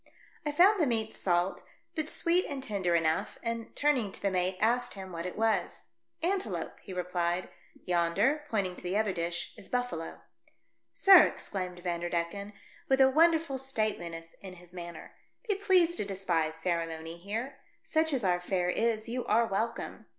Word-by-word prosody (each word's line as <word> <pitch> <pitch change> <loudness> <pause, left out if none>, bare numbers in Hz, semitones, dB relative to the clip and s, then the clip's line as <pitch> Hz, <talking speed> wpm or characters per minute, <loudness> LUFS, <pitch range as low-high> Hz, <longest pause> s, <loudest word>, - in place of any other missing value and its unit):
I - - +1
found 375 +7 +5
the 305 - +3
meat 220 -2 +1
salt, 175 0 0 0.3
but 310 -2 -2
sweet 345 +3 +2
and 275 -2 -4
tender 190 -7 0
enough, 160 -1 0
and 230 -1 -4
turning 265 -9 +2
to - - -6
the 200 - 0
mate 185 0 0
asked 245 +2 +1
him 190 -1 -8
what 170 +1 -4
it 180 - -7
was. 215 - 0 0.3
"Antelope," 380 +3 -2
he - - -10
repHed, 180 -1 -1 0.2
" - - -26
yonder," 185 - +2
pointing 195 -5 0
to - - -8
the 180 +3 -1
other 215 -3 +1
dish, 170 0 -3
"is - - -12
buffalo." 245 -10 -3 0.4
" - - -48
Sir," 385 -4 +10
exclaimed 180 -2 -6
Vanderdecken, 175 +3 -2 0.4
with 265 0 +4
a 265 0 +6
wonderful 320 -2 +3
stateliness 190 -10 -3
in 190 -2 -9
his 180 0 -15
manner, 175 -2 -8 0.3
"be 420 - +3
pleased 370 -4 +3
to - - -1
despise 175 -5 -1
ceremony 165 -1 -3
here. 225 +9 -5 0.2
Such 320 0 +1
as 265 -5 0
our 180 -2 +2
fare 180 0 0
is, 220 0 0
you 245 +2 -2
are 230 +2 +4
welcome. 225 +2 -3
200 Hz, 170 wpm, -30 LUFS, 175-265 Hz, 0.4 s, Sir